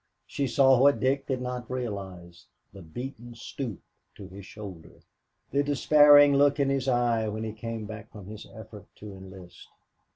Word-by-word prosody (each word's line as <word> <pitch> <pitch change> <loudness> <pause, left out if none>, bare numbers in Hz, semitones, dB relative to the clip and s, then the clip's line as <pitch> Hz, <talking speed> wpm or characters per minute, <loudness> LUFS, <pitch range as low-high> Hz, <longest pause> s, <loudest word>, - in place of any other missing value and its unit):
She 140 - -3
saw 130 +1 +4
what 140 -3 +4
Dick 135 +3 0
did 130 -2 -2
not 125 -1 -5
realize, 95 -8 -7 0.3
the 100 - -11
beaten 120 - -9
stoop 115 -2 -6 0.4
to - - -10
his 95 +1 -11
shoulder, 95 -6 -11 0.5
the 140 - +2
despairing 145 0 +6
look 145 +1 +3
in 140 -1 +2
his 135 -1 -1
eye 120 -3 +1
when 110 +1 -4
he 110 -1 -5
came 115 0 -6
back 110 0 -10
from 105 -3 -11
his 105 +2 -10
effort 105 -2 -12
to 105 -1 -10
enlist. 95 -2 -13
115 Hz, 165 wpm, -27 LUFS, 100-135 Hz, 0.5 s, despairing